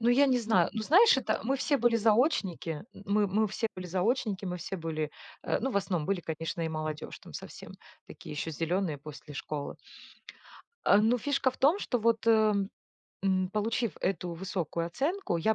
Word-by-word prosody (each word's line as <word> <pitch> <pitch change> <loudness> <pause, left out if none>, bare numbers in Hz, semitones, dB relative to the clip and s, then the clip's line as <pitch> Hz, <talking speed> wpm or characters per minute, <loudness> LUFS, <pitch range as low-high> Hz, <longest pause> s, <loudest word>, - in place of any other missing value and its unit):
Ну, 230 - +2
я 275 +4 +5
не 255 -2 +3
знаю, 225 -1 +3
ну 220 - -3
знаешь 365 - +6
это 215 -5 -1
мы 270 +4 +1
все 285 +2 +1
были 235 0 +3
заочники, 210 - +1 0.2
мы 205 +1 +2
мы 215 +3 +2
все 220 +2 -2
были 185 -1 -6
заочники 200 +2 0
мы 180 -1 -3
все 185 +3 -5
были, 155 -3 -3 0.3
э, - - +1
ну 265 +4 -1
в 230 - -1
основном 180 -6 0
были, 195 -2 0
конечно, 165 +1 -4
и 160 - 0
молодежь, 155 -1 -4
там - - -13
совсем, - - -9 0.3
такие - - -10
ещё 150 +2 -3
зелёные 165 0 -1
после 150 0 -10
школы. 145 0 -5 1.1
Э, 200 - +7
но 225 +4 +4
фишка 275 0 +1
в - - -17
том, 305 +9 +4
что, 250 - -1
вот, 230 0 +1
эм, 215 -3 +4 0.8
получив 220 -1 0
эту 180 -2 -1
высокую 170 -1 -3
оценку, 295 - -1
я 220 +7 +2
200 Hz, 180 wpm, -30 LUFS, 170-235 Hz, 1.1 s, Э